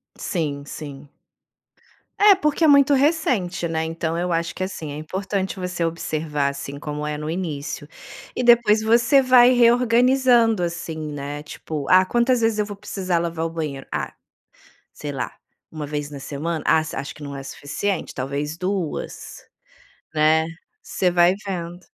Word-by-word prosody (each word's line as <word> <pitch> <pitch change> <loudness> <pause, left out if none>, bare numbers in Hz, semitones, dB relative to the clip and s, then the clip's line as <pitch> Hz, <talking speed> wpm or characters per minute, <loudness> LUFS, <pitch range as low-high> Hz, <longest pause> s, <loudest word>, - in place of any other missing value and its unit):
Sim, 145 -5 -3
sim. 145 -1 -9 1.1
É, 410 0 +8
porque 300 -3 0
é - - +6
muito 280 -1 +6
recente, 260 - +1
né, 160 -1 -1
então 165 0 -3
eu 175 0 -1
acho 165 0 -1
que 185 - -3
assim, 165 -5 -5
é 145 - -6
importante 190 +4 -3
você 180 -2 -2
observar, 155 -3 -2
assim, 140 0 -7
como 150 0 -4
é 150 0 -2
no 150 +1 -5
início, 155 -4 -4 0.5
e - - -1
depois 235 -3 +5
você 235 +5 +4
vai 255 -1 +6
reorganizando, 240 -2 +4
assim, 170 -1 -4
né, 145 -1 -5
tipo: 150 -1 -6
"ah, 185 0 +7
quantas 240 +4 +2
vezes 225 -1 +2
eu 210 - +1
vou 205 0 -7
precisar 185 -3 -2
lavar 165 -1 -2
o 165 - -1
banheiro? 150 -5 -4
Ah, - - -2 0.8
sei 145 - -6
lá, 130 -4 -4 0.4
1 155 -2 -6
vez 145 0 -4
na 145 -1 -8
semana? 150 +4 -4
Ah, - - +5
s 155 0 -5
acho 140 - -5
que - - -16
não 140 -1 -6
é 135 - -6
o - - -11
suficiente, 150 +7 -3
talvez 145 +4 -3
2?", 185 -3 -4 0.7
né, 155 +1 +3 0.4
você 185 - 0
vai 175 +1 +4
vendo. 175 -2 -4
170 Hz, 165 wpm, -22 LUFS, 150-215 Hz, 1.1 s, É